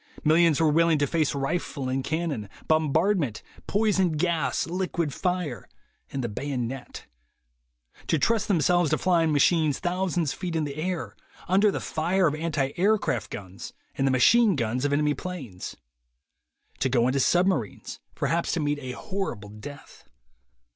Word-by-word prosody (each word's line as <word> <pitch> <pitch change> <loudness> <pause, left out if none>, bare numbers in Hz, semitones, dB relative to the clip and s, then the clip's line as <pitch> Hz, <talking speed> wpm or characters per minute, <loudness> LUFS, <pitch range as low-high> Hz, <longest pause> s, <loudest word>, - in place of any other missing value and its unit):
Millions 160 0 +4
were 160 -2 +4
willing 165 +1 +4
to 145 - +2
face 155 -1 0
rifle 140 -1 -2
and 130 +1 -1
cannon, 150 -10 -2 0.2
bombardment, 155 - +1 0.2
poison 200 -5 +2
gas, 165 +1 0
liquid 170 -3 -2
fire, 180 -8 -2 0.4
and 135 - -3
the - - 0
bayonet; 130 +2 -5 1.0
to 160 - +2
trust 215 +8 +1
themselves 175 -2 +3
to 155 - +2
flying 170 -3 +2
machines 150 0 +3
thousands 175 -4 -1
of - - -14
feet 180 -3 -3
in 155 -2 0
air, 165 +5 -4 0.3
under 195 +4 +4
the - - -2
fire 175 +4 0
of 150 - +2
anti 150 -4 -1
aircraft 195 - +1
guns 95 -1 -8 0.2
and 135 - 0
the - - +3
machine 205 - +5
guns 125 +1 -1
of 145 - +1
enemy 150 +1 +2
planes; 135 - -7 1.0
to 135 - +1
go 120 -2 +3
into 130 +2 +1
sub 175 +7 +3
marines, 180 - -2 0.2
perhaps 170 +1 0
to 175 - 0
meet 145 -1 0
a 130 -2 -6
horrible 190 - -4
death. 105 +8 -11
155 Hz, 150 wpm, -26 LUFS, 135-180 Hz, 1.0 s, machine